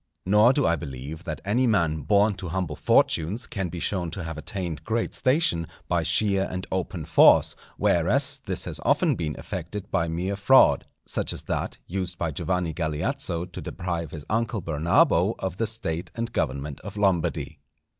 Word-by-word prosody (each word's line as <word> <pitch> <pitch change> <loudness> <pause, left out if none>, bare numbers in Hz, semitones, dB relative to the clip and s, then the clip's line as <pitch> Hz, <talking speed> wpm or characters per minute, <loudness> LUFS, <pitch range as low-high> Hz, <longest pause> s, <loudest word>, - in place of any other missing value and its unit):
Nor 105 +5 +6
do 145 +1 +1
I 85 - +3
believe 75 +3 -7
that 75 -4 -5
any 120 +6 +2
man 85 -8 +1
born 100 +8 +3
to 90 - -6
humble 90 -4 -2
fortunes 100 +13 +2
can 95 -4 -3
be 85 - -6
shown 90 -1 -1
to 90 +2 -6
have 80 -1 -5
attained 85 +1 -4
great 115 +1 -1
station, 130 - +1 0.2
by - - +1
sheer 100 -2 +2
and 90 0 -4
open 90 -3 -3
force, - - +5 0.2
whereas - - +2
this - - -2
has - - -4
often - - +3
been 75 -3 -3
effected 90 +3 -6
by 85 -4 +1
mere 90 +4 -2
fraud, 115 +7 +5 0.2
such - - -2
as - - -7
that - - -3
used 90 -1 -4
by 85 -2 -1
Giovanni 90 +2 -1
Galeazzo 80 +1 -2
to 90 -2 -9
deprive 85 -3 -4
his 75 -1 -8
uncle 110 -2 -1
Bernabo 80 +1 +3
of 95 -2 -4
the 115 - 0
State 85 -7 -2
and 115 0 -4
government 70 0 -2
of 100 0 -9
Lombardy. 90 -6 0
90 Hz, 175 wpm, -25 LUFS, 80-100 Hz, 0.2 s, Nor